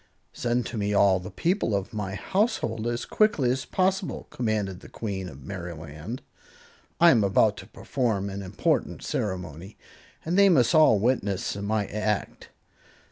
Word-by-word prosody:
"Send 120 0 -1
to 115 -2 -4
me 105 0 0
all 100 -2 +5
the 90 0 -8
people 170 - 0
of 100 +1 -3
my 100 -2 -3
household, 120 - -1
as 120 0 -2
quickly 155 - +2
as 130 +1 -2
possible," 190 0 -1
commanded 105 -6 -2
the - - -13
Queen 95 -4 -4
of 70 -2 -12
Merryland. 85 - -7 0.8
"I 170 0 +8
am 115 -7 +4
about 100 +2 +3
to - - -10
perform 115 -7 -2
an 100 0 -5
important 95 +1 -1
ceremony, 90 -1 -4 0.5
and 175 +4 +1
they 200 0 +7
must 125 -9 +4
all 155 -9 +6
witness 100 -4 0
my 100 +1 -1
act." 105 0 -3
105 Hz, 150 wpm, -26 LUFS, 95-125 Hz, 0.8 s, I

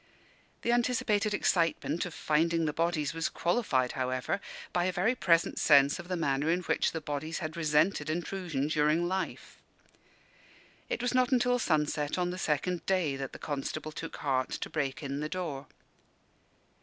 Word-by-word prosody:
The 235 - +2
anticipated 230 -3 +1
excitement 170 -3 +1
of 170 - -9
finding 165 +2 +1
the 150 - -1
bodies 165 -3 0
was 165 -1 -1
qualified, 160 - +1
however, 130 +8 -2 0.3
by 175 0 +2
a 185 - +1
very 185 +7 +2
present 170 -8 +2
sense 140 -1 +5
of 175 - -8
the 180 - -1
manner 145 -1 0
in 175 +2 +2
which - - +1
the 165 - -3
bodies 150 +2 -3
had 160 -1 -4
resented 155 0 +2
intrusion 170 -3 -2
during 155 +2 +2
life. 190 +1 -4 1.3
It - - -2
was 245 - 0
not 255 0 +3
until 245 -1 +3
sunset 150 -5 0
on 180 -1 0
the 180 - -5
second 170 +2 -1
day 180 -7 +1
that 135 -1 -5
the - - -9
constable 145 +1 -4
took 165 +1 -6
heart 130 -3 0
to - - -5
break 140 -2 -2
in 140 0 -3
the 150 +1 -3
door. 150 -7 -4
165 Hz, 165 wpm, -30 LUFS, 145-180 Hz, 1.3 s, sense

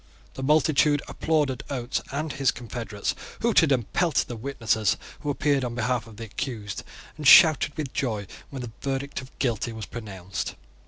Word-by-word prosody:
The - - -7
multitude 150 0 +3
applauded 150 -5 0
Oates 125 -3 -2
and 150 +2 -2
his 135 -2 +2
confederates, 115 -4 -3 0.3
hooted 205 -10 +4
and 120 -5 0
pelted 170 -3 +2
the 120 - -4
witnesses 110 -4 0 0.2
who 145 - -4
appeared 140 -1 +1
on 120 -1 -3
behalf 120 0 0
of 110 -2 -13
the 115 - -6
accused, 110 -2 -4 0.4
and 150 -3 -1
shouted 155 0 +8
with 150 -4 -4
joy 110 -6 -1 0.2
when 135 -3 -6
the 120 - -6
verdict 135 0 -2
of 130 - -15
Guilty 120 -3 0
was 110 -1 -6
pronounced. 100 -5 -5
130 Hz, 165 wpm, -26 LUFS, 115-145 Hz, 0.4 s, shouted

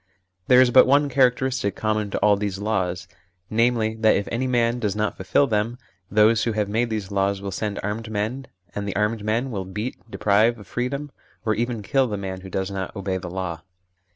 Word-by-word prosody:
There 125 - +7
is 130 -1 +5
but 130 - +7
one 145 +2 +4
characteristic 130 -3 +1
common 110 -1 -1
to - - -2
all 105 -1 +5
these 100 -1 -3
laws, 95 -4 -2 0.4
namely, 115 -1 +2
that 110 -1 +4
if 100 - -1
any 125 +3 -1
man 120 -1 +1
does 105 -4 -1
not 105 0 -1
fulfil 95 +9 +2
them, 115 0 -1 0.3
those 110 +2 +4
who 115 - 0
have 105 -1 0
made 115 +4 0
these 105 -3 -4
laws 100 0 +1
will 100 0 -5
send 100 +2 -3
armed 110 +3 -3
men, 110 +6 -3 0.3
and 100 0 -4
the 100 - -3
armed 105 +1 0
men 115 +5 0
will 100 -4 -3
beat, 105 +7 -5
deprive 110 +3 +2
of 105 - -12
freedom, 140 +6 -3 0.3
or 110 - +2
even 115 -1 -2
kill, 135 +5 +2
the 105 -3 -3
man 95 -1 -5
who 95 - -9
does 95 +1 -2
not 95 -2 -4
obey 95 -1 -2
the 90 -1 -6
law. 90 -2 -4
110 Hz, 210 wpm, -23 LUFS, 100-120 Hz, 0.4 s, There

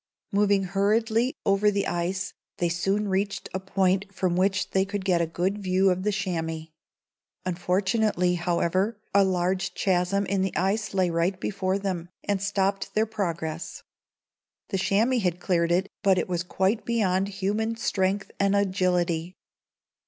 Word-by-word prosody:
Moving 200 -1 +3
hurriedly 220 +6 +1
over 200 +1 +4
the 200 -1 0
ice, 180 +2 -2 0.2
they 175 - +1
soon 195 +5 0
reached 195 -1 -1
a 190 - -1
point 190 +1 0
from 185 -2 0
which 190 +1 +1
they 190 - +3
could 200 0 -4
get 180 -3 +3
a 170 - +1
good 185 +5 -1
view 190 0 +2
of 180 +1 -1
the 210 +2 +1
chamois. 165 -5 -3 0.8
Unfortunately, 185 +1 +1
however, 180 +4 0
a 200 0 +6
large 185 0 0
chasm 190 +1 +1
in 195 0 0
the 190 -2 -1
ice 195 +3 0
lay 185 -2 +2
right 170 +3 0
before 190 -1 -1
them, 185 -4 -3
and 200 -2 -1
stopped 195 -1 -1
their 215 +1 +3
progress. 170 -6 -4 0.9
The 195 - -1
chamois 225 +7 +2
had 180 -4 0
cleared 170 -2 +1
it, 185 +3 +2
but 195 -3 +4
it - - 0
was 175 -2 -1
quite 190 +5 0
beyond 195 -4 +1
human 205 +3 -1
strength 195 -2 -1
and 200 0 +3
agility. 180 -3 +1
190 Hz, 150 wpm, -26 LUFS, 180-200 Hz, 0.9 s, a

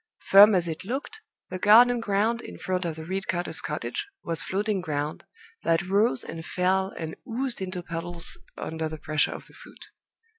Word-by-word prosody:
Firm 205 +1 +9
as 175 -2 +2
it 160 -1 -4
looked, 270 - -5 0.3
the 185 - -4
garden 240 +5 +7
ground 225 +2 +1
in - - -9
front 185 -1 -2
of 165 -2 -2
the 160 0 -8
reed 190 +3 -3
cutter's 175 -1 -1
cottage 420 - -4 0.2
was 165 -1 -3
floating 200 +1 -1
ground, 150 -2 -3 0.4
that 165 0 +2
rose 195 - +2
and 165 - -7
fell 190 +2 0
and 160 -1 -5
oozed 245 -1 -2
into 185 -1 -4
puddles 170 0 -4 0.2
under 160 0 -3
the 155 - -6
pressure 155 0 0
of - - -9
the - - -19
foot. - - -13
185 Hz, 180 wpm, -26 LUFS, 165-210 Hz, 0.4 s, Firm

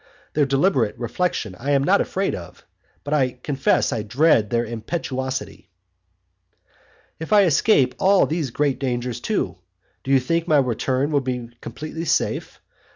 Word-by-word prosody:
Their 145 -2 +2
deliberate 135 - +1
reflection 120 - -2
I 135 +4 -4
am 135 -1 +3
not - - +3
afraid - - -1
of, - - -9 0.4
but 145 - -3
I 130 -4 +2
confess 140 -2 +1
I 110 - -2
dread 115 0 +2
their 120 +1 0
impetuosity. 130 +3 -4 1.5
If 160 - -7
I 210 -1 +6
escape 145 - +3
all 195 0 +4
these 155 -3 -2
great 140 +1 0
dangers 125 -2 -2
too, 195 - -2 0.4
do - - -7
you 135 -1 +5
think 165 +6 -1
my 155 - +4
return 130 +2 0
will 145 -2 +2
be 125 -2 -4
completely 155 +7 -6
safe? - - -1
135 Hz, 150 wpm, -22 LUFS, 120-155 Hz, 1.5 s, I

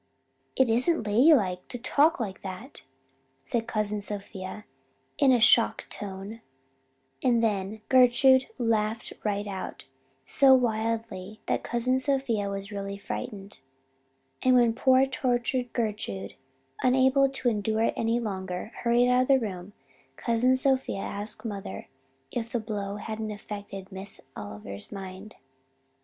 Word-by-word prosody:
"'It 260 - +4
isn't 245 +4 +3
ladylike 210 - +3
to 245 - -5
talk 290 +7 +3
like 200 -5 -4
that,' 195 +8 -8 0.6
said 230 - -2
Cousin 210 -1 -1
Sophia 205 0 -5 0.5
in 275 -3 +5
a 250 - +4
shocked 225 +1 +4
tone; 200 +2 -6 0.8
and 235 -2 +3
then 205 -1 -1
Gertrude 260 +1 +5
laughed 225 -2 -1
right 205 -1 -1
out, 195 -2 -6 0.4
so 270 -2 +6
wildly 220 -4 -2
that - - 0
Cousin 250 +2 0
Sophia 260 -7 0
was 200 +1 -5
really 200 -1 -5
frightened. 200 - -7 0.8
And 255 0 +4
when 240 -2 +4
poor 260 +2 +4
tortured 255 -2 -1
Gertrude, 205 - -3 0.5
unable 265 +2 +4
to 270 -2 -2
endure 220 0 0
it - - +1
any 230 +1 0
longer, 190 -2 -4
hurried 240 +1 +3
out 250 0 +4
of 255 - 0
the 275 - +6
room, 195 -3 -6 0.4
Cousin 240 +2 +2
Sophia 260 -6 +1
asked 205 +4 -2
mother 195 - -6 0.4
if 230 -1 -3
the 240 - 0
blow 205 -2 -4
hadn't 220 +1 -5
affected 205 -2 -8
Miss 190 +1 -5 0.2
Oliver's 100 -1 -8
mind. 195 +1 -8
220 Hz, 130 wpm, -27 LUFS, 200-250 Hz, 0.8 s, so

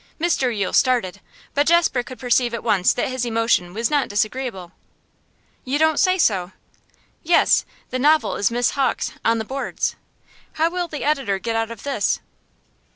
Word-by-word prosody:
Mr 320 -6 +1
Yule 205 -5 -2
started, 210 -7 +1 0.3
but 285 +1 +1
Jasper 335 -6 +3
could 255 +1 -10
perceive 245 -1 +1
at 235 - -6
once 205 -5 +3
that - - -1
his 255 -1 -3
emotion 225 -6 +1
was 225 +6 -2
not 290 -2 +2
disagreeable. 210 -3 -2 0.9
'You 265 +3 -1
don't 315 -1 +2
say 370 -1 +3
so.' 195 - +1 0.7
'Yes. 340 +1 +3 0.3
The 255 - -2
novel 305 +4 +3
is 200 - +1
Miss 240 +1 +1
Hawk's 275 -2 -1
"On 230 0 +2
the 220 - -3
Boards." 270 +4 -3 0.6
How 325 +2 +1
will 355 -1 -2
the 305 -3 -6
editor 275 -10 0
get 225 +4 -3
out 225 0 -1
of 230 -3 -9
this? 280 -1 0
245 Hz, 165 wpm, -21 LUFS, 220-290 Hz, 0.9 s, Jasper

